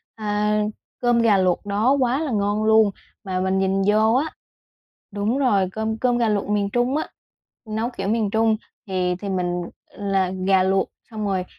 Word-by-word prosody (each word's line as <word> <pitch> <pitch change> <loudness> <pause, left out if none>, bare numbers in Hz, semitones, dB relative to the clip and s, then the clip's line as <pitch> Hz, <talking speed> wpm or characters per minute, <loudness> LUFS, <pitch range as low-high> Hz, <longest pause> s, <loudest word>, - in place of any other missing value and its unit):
a, 210 0 0 0.4
cơm 240 -1 +3
gà 215 -4 +4
luộc 185 +1 +1
đó 205 +5 +1
quá 255 +1 +1
là 310 -4 -2
ngon 205 0 0
luôn. 220 -1 +5 0.3
Mà 185 -2 -2
mình 190 +1 0
nhìn 195 0 +1
vô 215 +2 +4
á 275 +4 +2 0.9
đúng 210 +6 -1
rồi, 205 -9 +2
cơm 220 +1 -2
cơm 245 0 +1
gà 235 -2 +2
luộc 205 -1 0
miền 205 -1 0
Trung 245 +5 +1
á, 310 - -1 0.6
nấu 220 +3 -2
kiểu 240 - -4
miền 215 -1 +1
Trung, 220 +1 +2 0.3
thì 185 -2 0
thì 205 - -5
mình 180 -2 -1 0.3
là 195 -2 0 0.2
gà 190 -1 +4
luộc 190 +1 +1 0.2
xong 215 -2 -4
rồi 190 -2 -1
210 Hz, 180 wpm, -22 LUFS, 195-225 Hz, 0.9 s, luôn